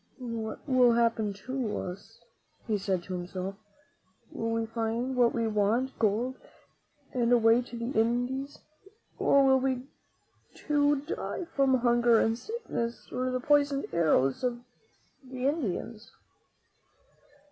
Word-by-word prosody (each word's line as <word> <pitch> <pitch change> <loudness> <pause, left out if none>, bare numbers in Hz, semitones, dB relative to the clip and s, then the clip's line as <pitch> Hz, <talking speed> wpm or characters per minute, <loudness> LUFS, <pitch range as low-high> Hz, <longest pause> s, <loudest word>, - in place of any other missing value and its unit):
"What 220 +2 -5
will 250 -3 +5
happen 230 -3 +1
to 245 +2 -4
us?" 185 +3 -7 0.5
he 215 -2 0
said 190 -3 -1
to 185 - -7
himself. 180 +2 -4 0.8
"Will 225 - -3
we 225 0 0
find 230 +3 -2
what 245 -2 +4
we 230 -1 -1
want, 220 +5 0
gold 230 +4 0 0.8
and 240 -1 +1
a 245 - +7
way 225 +1 +4
to 240 -1 -9
the 235 +2 -3
Indies, 245 +4 0 0.6
or 280 -1 +4
will 265 0 +5
we 260 -1 -1 0.7
too 290 -1 +1
die 330 +3 -4
from 265 -2 +3
hunger 240 -1 +4
and 225 - +2
sickness 245 - -5
and 255 +1 -1
the - - 0
poisoned 285 0 +2
arrows 155 - +2
of 240 -1 -1 0.6
the 255 0 -6
Indians?" 235 - -2
240 Hz, 130 wpm, -29 LUFS, 220-260 Hz, 0.8 s, a